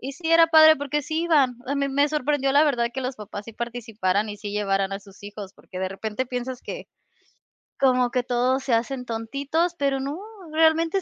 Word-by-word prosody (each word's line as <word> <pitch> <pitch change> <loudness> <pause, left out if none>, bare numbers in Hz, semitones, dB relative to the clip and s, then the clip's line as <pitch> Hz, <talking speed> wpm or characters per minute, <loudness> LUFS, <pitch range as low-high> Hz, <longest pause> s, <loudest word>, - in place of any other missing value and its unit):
y 270 +2 -6
sí 325 +2 -4
era 330 0 +6
padre 315 -1 +8
porque 285 +1 -2
sí 315 +4 -2
iban. 285 -7 +3
A 280 - -1
mí 280 0 0
me 285 +2 +2
sorprendió, 290 -2 0
la 290 +2 +5
verdad, 240 -5 +1
que 265 - -4
los 255 0 -3
papás 205 -1 -8
sí 230 - -10
participaran 220 -4 -2
y 205 - -6
sí 205 0 -7
llevaran 195 -1 0
a 195 - -3
sus 200 +1 -17
hijos, 205 -1 -8
porque 185 - -11
de 190 - -1
repente 215 +6 -4
piensas 250 0 -5
que - - -7 0.9
como 255 -2 +3
que 250 - +1
todos 255 +1 0
se 255 - -1
hacen 250 +3 -2
tontitos, 280 +9 -2
pero 275 -1 +1
no, 280 +5 -4 0.3
realmente 325 +3 +3
255 Hz, 205 wpm, -24 LUFS, 220-290 Hz, 0.9 s, padre